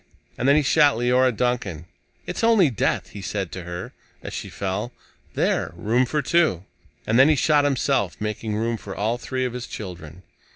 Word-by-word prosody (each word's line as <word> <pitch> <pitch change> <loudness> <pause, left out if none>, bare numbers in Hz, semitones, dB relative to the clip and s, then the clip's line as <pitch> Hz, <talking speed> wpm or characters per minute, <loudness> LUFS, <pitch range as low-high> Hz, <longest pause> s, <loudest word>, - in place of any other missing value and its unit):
And 130 - +1
then 140 - +6
he 155 - +3
shot 145 -1 +4
Leora 125 +2 +3
Duncan. 110 -9 -2 0.4
"It's - - -4
only 220 -10 +5
death," 110 - -1
he 100 - -8
said 95 -2 -3
to 90 -2 -7
her 90 +1 -6 0.3
as - - -7
she - - -5
fell. 100 +5 -3 0.4
"There! - - 0
Room 120 +4 +1
for 150 +3 -1
two." 160 - +2 0.4
And 115 +3 +2
then 135 +3 +7
he 155 - +4
shot 145 +1 +3
himself, 135 -8 0
making 105 0 -3
room 115 +2 -1
for 100 -2 -8
all 110 +4 -1
three 130 +1 -2
of 125 - -3
his 125 -1 -6
children. 90 -4 -8
120 Hz, 190 wpm, -23 LUFS, 100-135 Hz, 0.4 s, then